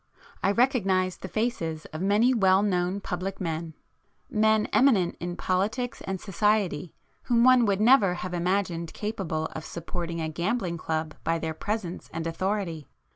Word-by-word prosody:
I -, -, +2 dB
recognised 195 Hz, -6 st, +2 dB
the -, -, -5 dB
faces 170 Hz, -6 st, -2 dB
of 155 Hz, -, -5 dB
many 210 Hz, +6 st, +3 dB
well 195 Hz, -3 st, +4 dB
known 185 Hz, 0 st, 0 dB
public 185 Hz, +1 st, -4 dB
men,—men 205 Hz, -, -2 dB
eminent 220 Hz, -10 st, +4 dB
in 175 Hz, 0 st, -4 dB
politics 210 Hz, +8 st, -1 dB
and 190 Hz, -1 st, -2 dB
society 195 Hz, -5 st, 0 dB, 0.3 s
whom 235 Hz, -1 st, +3 dB
one 255 Hz, -1 st, +6 dB
would 200 Hz, -1 st, +1 dB
never 215 Hz, -5 st, +5 dB
have 180 Hz, 0 st, -5 dB
imagined 175 Hz, -2 st, -1 dB
capable 190 Hz, -7 st, -3 dB
of 155 Hz, -, -6 dB
supporting 170 Hz, 0 st, -5 dB
a 160 Hz, -, -1 dB
gambling 175 Hz, +2 st, -2 dB
club 155 Hz, -1 st, -2 dB
by 165 Hz, 0 st, +1 dB
their 160 Hz, -1 st, -3 dB
presence 195 Hz, 0 st, -4 dB
and 165 Hz, 0 st, -4 dB
authority. 170 Hz, -3 st, -2 dB
185 Hz, 145 wpm, -27 LUFS, 170-215 Hz, 0.3 s, one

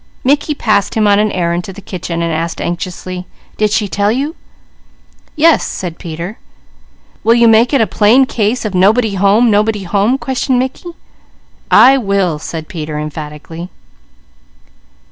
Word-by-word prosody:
Mickey 290 Hz, +3 st, +1 dB
passed 205 Hz, -6 st, 0 dB
him 220 Hz, -1 st, +2 dB
on 205 Hz, 0 st, +4 dB
an 210 Hz, 0 st, +1 dB
errand 170 Hz, -1 st, -1 dB
to -, -, -7 dB
the 200 Hz, -, -11 dB
kitchen 175 Hz, -3 st, -5 dB
and 165 Hz, -1 st, -1 dB
asked 165 Hz, +1 st, -3 dB
anxiously: 180 Hz, +1 st, -5 dB, 0.3 s
"Did 215 Hz, 0 st, +2 dB
she 210 Hz, 0 st, 0 dB
tell 200 Hz, +1 st, 0 dB
you?" 280 Hz, +7 st, -2 dB, 1.0 s
"Yes," 320 Hz, +1 st, +4 dB
said 175 Hz, -3 st, -5 dB
Peter. 170 Hz, +5 st, -7 dB, 0.8 s
"Will 230 Hz, +1 st, +4 dB
you 235 Hz, -1 st, +5 dB
make 225 Hz, +2 st, +4 dB
it 275 Hz, -4 st, +3 dB
a -, -, +4 dB
plain 225 Hz, +6 st, +3 dB
case 225 Hz, 0 st, -1 dB
of 210 Hz, -, -3 dB
'nobody 210 Hz, +4 st, +3 dB
home! 200 Hz, +5 st, +3 dB
nobody 210 Hz, 0 st, +1 dB
home?'" 205 Hz, +7 st, +1 dB
questioned 265 Hz, -1 st, -1 dB
Mickey. 260 Hz, +7 st, -3 dB, 0.8 s
"I 270 Hz, +1 st, +6 dB
will!" 195 Hz, -8 st, 0 dB
said 160 Hz, 0 st, -6 dB
Peter 155 Hz, -3 st, -6 dB
emphatically. 150 Hz, +3 st, -7 dB
205 Hz, 150 wpm, -14 LUFS, 175-235 Hz, 1.0 s, I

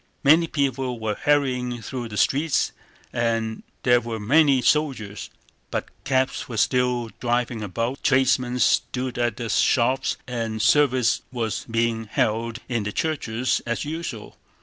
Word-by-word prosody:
Many 160 Hz, +4 st, +5 dB
people 135 Hz, -5 st, -1 dB
were 110 Hz, -1 st, -1 dB
hurrying 125 Hz, -2 st, 0 dB
through 125 Hz, 0 st, -5 dB
the 105 Hz, -, -6 dB
streets 145 Hz, -, +2 dB, 0.4 s
and 115 Hz, -2 st, -1 dB, 0.2 s
there 125 Hz, -1 st, +4 dB
were 115 Hz, -1 st, -5 dB
many 140 Hz, +5 st, +4 dB
soldiers, 125 Hz, -10 st, 0 dB, 0.4 s
but -, -, -3 dB, 0.2 s
cabs 130 Hz, -1 st, 0 dB
were 115 Hz, -, -5 dB
still 125 Hz, -1 st, +1 dB
driving 120 Hz, -2 st, -1 dB
about, 115 Hz, +7 st, -3 dB
tradesmen 130 Hz, -1 st, +2 dB
stood 125 Hz, 0 st, +1 dB
at 120 Hz, -3 st, 0 dB
their 115 Hz, -2 st, -4 dB
shops, 130 Hz, +4 st, +2 dB
and 115 Hz, -3 st, -3 dB
service 125 Hz, +1 st, +3 dB
was 115 Hz, -4 st, -3 dB
being 115 Hz, 0 st, 0 dB
held 115 Hz, +2 st, -1 dB
in 120 Hz, -3 st, -1 dB
the 105 Hz, 0 st, -3 dB
churches 130 Hz, -4 st, -1 dB
as 120 Hz, +4 st, -2 dB
usual. 150 Hz, -8 st, -6 dB
120 Hz, 135 wpm, -24 LUFS, 115-130 Hz, 0.4 s, Many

